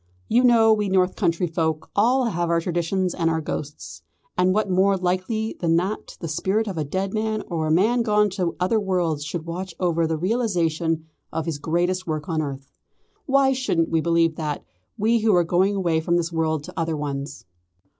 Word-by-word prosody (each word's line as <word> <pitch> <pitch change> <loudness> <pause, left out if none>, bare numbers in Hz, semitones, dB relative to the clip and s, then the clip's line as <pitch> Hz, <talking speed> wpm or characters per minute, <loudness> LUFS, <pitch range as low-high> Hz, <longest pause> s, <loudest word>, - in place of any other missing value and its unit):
"You 240 +3 +3
know 230 -3 +6
we 210 -2 0
North 185 -1 +2
country 170 +2 +1
folk 160 -2 -2
all 245 +5 +3
have 175 -6 -1
our 170 0 +3
traditions 175 +2 -1
and 165 -2 0
our 160 0 0
ghosts; 150 -1 -6 0.3
and 180 +1 +3
what 215 +2 +1
more 190 +1 +3
likely 185 +5 -1
than 165 -2 +2
that 190 +5 -2
the 165 - -5
spirit 195 +8 0
of 195 - -4
a 155 - -1
dead 190 +7 -3
man 215 0 -1
or 160 -3 -1
a - - 0
man 220 +9 +3
gone 210 -2 +2
to 180 -3 -2
other 185 +5 +2
worlds 175 -7 -1
should 155 +2 -5
watch 175 +1 -5
over 170 -2 +1
the 160 0 -1
realisation 170 -5 0 0.3
of 160 - -3
his 160 -3 -3
greatest 175 +4 -1
work 155 +1 -3
on 160 -3 0
earth? 140 -2 -6 0.6
Why 270 -1 +4
shouldn't 180 -11 0
we 165 -1 +2
believe 165 -1 +2
that, 150 -2 -3 0.3
we 225 +3 +2
who 215 -3 +3
are 175 - +4
going 185 +4 +2
away 170 -4 +1
from 170 +2 +1
this 170 0 -2
world 160 -2 0
to - - -10
other 165 -1 -1
ones?" 140 -1 -5
175 Hz, 195 wpm, -23 LUFS, 160-200 Hz, 0.6 s, know